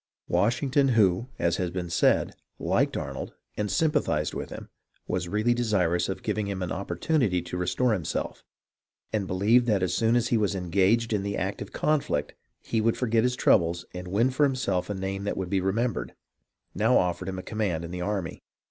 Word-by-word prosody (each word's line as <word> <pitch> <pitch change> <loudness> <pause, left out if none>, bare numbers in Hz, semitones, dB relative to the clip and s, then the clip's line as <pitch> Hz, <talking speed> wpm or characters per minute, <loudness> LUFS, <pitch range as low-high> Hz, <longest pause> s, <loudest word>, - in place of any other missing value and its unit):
Washington, 130 +9 +2
who, 110 -3 +3
as 85 0 +1
has 90 -1 -1
been 90 -1 -4
said, - - +3 0.2
liked - - +1
Arnold - - -5 0.2
and 105 -1 -2
sympathized 140 - +1
with - - -5
him, - - -8 0.4
was - - -2
really 110 +4 +2
desirous 100 -8 +1
of - - -4
giving 105 -1 -1
him 95 -2 -3
an 90 - -4
opportunity 100 - 0
to 90 - -6
restore 90 +7 +1
himself, 90 -7 -3 0.7
and 105 -3 0
believed 110 +7 +3
that 100 -5 +2
as 90 - 0
soon 115 +1 +2
as 120 0 +2
he 120 - +3
was 105 -2 +1
engaged 100 +6 +2
in 105 - +1
the 100 +1 -3
active 100 +1 -3
conflict 140 - 0 0.3
he 115 - 0
would 115 +1 +1
forget 115 -3 +2
his 125 +1 +1
troubles 85 -6 +2
and 90 0 -6
win 110 +8 +2
for 135 +3 +1
himself 130 -10 0
a 105 - -2
name 95 +1 -3
that 100 - -2
would 95 -2 -3
be 95 -1 +2
remembered, 115 +6 -1 0.6
now - - +3
offered 90 +1 0
him 95 - -4
a 95 - -5
command 95 -7 -2
in 85 - -8
the 90 0 -4
army. 95 -4 -3
100 Hz, 190 wpm, -27 LUFS, 90-115 Hz, 0.7 s, who